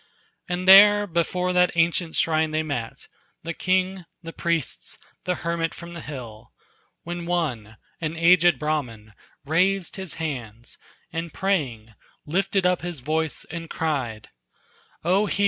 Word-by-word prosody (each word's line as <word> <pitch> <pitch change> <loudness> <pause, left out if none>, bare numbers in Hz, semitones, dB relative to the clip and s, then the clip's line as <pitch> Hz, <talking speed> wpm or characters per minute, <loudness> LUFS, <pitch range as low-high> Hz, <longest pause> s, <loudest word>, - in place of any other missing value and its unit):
And 180 +1 -2
there 205 +2 +9
before 180 0 0
that 180 0 +4
ancient 165 0 +1
shrine 160 -1 +2
they 155 0 -1
met, 125 -7 -5 0.4
The 165 +1 -4
king, 185 0 0 0.2
the 165 0 -8
priests, 170 -2 -2 0.3
the 180 0 0
hermit 170 -1 -1
from 170 0 -9
the 170 - -7
hill, 120 -6 -9 0.5
When 175 0 -5
one, 125 -12 -2 0.2
an 160 0 -3
aged 175 +1 +5
Brahman, 125 -9 -3 0.3
raised 180 +5 +1
his 190 -3 -5
hands, 120 -8 -6 0.3
And 165 0 -4
praying, 135 - -2 0.3
lifted 190 +4 0
up 180 -1 +2
his 175 -6 -5
voice 155 +3 -2
and 165 -1 -6
cried: 130 -9 -3 0.7
"O 190 +5 +2
hear! 195 - -2
165 Hz, 135 wpm, -24 LUFS, 150-180 Hz, 0.7 s, there